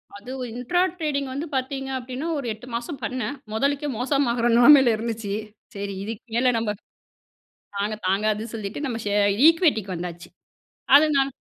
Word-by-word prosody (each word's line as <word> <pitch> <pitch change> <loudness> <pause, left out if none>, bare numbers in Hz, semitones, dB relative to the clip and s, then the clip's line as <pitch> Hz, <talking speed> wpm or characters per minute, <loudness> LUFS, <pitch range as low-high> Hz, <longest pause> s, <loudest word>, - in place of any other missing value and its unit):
அதுவும் 250 +4 -6
intra 250 +9 0 0.2
trading 280 -5 -2
வந்து 285 +5 -3
பார்த்தீங்க 270 +1 -3
அப்படின்னா, 255 +5 -5
ஒரு 275 - -4
8 225 +4 -13
மாசம் 240 +4 -5
பண்ணேன். 250 +3 -3 0.2
மொதலுக்கே 280 +5 0
மோசமாகிற 245 -2 +1
நிலைமையில 265 -1 +7
இருந்துச்சு. 225 -2 -4 0.4
சரி 200 0 -4
இதுக்கு 220 0 -6
மேல 250 +1 +3
நம்ம, 225 -2 -1 1.0
தாங்க 210 +2 -1
தாங்காதுன்னு 215 +3 0
சொல்லிட்டு 210 +3 -5
நம்ம 245 -4 -3
ஷே 205 - 0 0.3
ஈக்விட்டிக்கு 290 - +2
வந்தாச்சு. 175 0 -7 0.7
அதுனா 280 -3 +2
245 Hz, 135 wpm, -24 LUFS, 215-275 Hz, 1.0 s, நிலைமையில